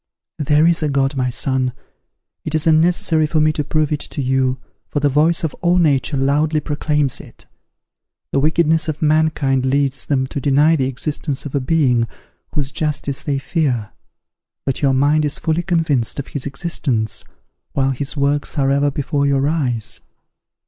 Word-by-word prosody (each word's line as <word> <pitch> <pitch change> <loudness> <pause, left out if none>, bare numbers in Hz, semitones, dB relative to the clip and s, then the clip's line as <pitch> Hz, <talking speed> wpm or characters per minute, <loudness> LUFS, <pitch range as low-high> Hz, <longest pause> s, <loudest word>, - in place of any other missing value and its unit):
There 150 +1 +3
is 170 0 +3
a 155 - 0
God, 135 0 +1
my 130 -1 0
son; 130 0 0 0.7
it 155 - -3
is 155 - +1
unnecessary 160 -1 +3
for 155 +1 0
me 155 0 +3
to 150 - -2
prove 155 +1 0
it 150 - 0
to - - -6
you, 130 -1 +1 0.3
for 145 - -1
the 145 0 +2
voice 155 +5 +2
of 160 - -1
all 175 0 +3
nature 145 -4 +2
loudly 150 +3 +1
proclaims 150 -2 -1
it. - - -16 0.9
The - - +2
wickedness 160 +1 +2
of 155 0 -3
mankind 150 -4 +2
leads 135 0 0
them 135 -2 +1
to 135 +1 -5
deny 145 +4 +4
the 130 -4 0
existence 140 +2 -2
of 145 - -6
a 140 - +1
Being, 130 -5 +2 0.5
whose 140 -2 -1
justice 145 -2 -2
they 140 -2 -1
fear. 135 -6 -1 0.7
But 135 - -1
your 135 -2 +3
mind 145 +3 +3
is 145 -1 -1
fully 160 +1 0
convinced 160 -9 0
of 140 - -5
his 145 -1 -4
existence, 135 - -2 0.5
while 135 -1 +1
his 140 +3 -4
works 145 +2 0
are 135 -1 +2
ever 140 +1 +2
before 140 0 -1
your 140 0 +2
eyes. 130 -8 -2
145 Hz, 170 wpm, -19 LUFS, 135-155 Hz, 0.9 s, deny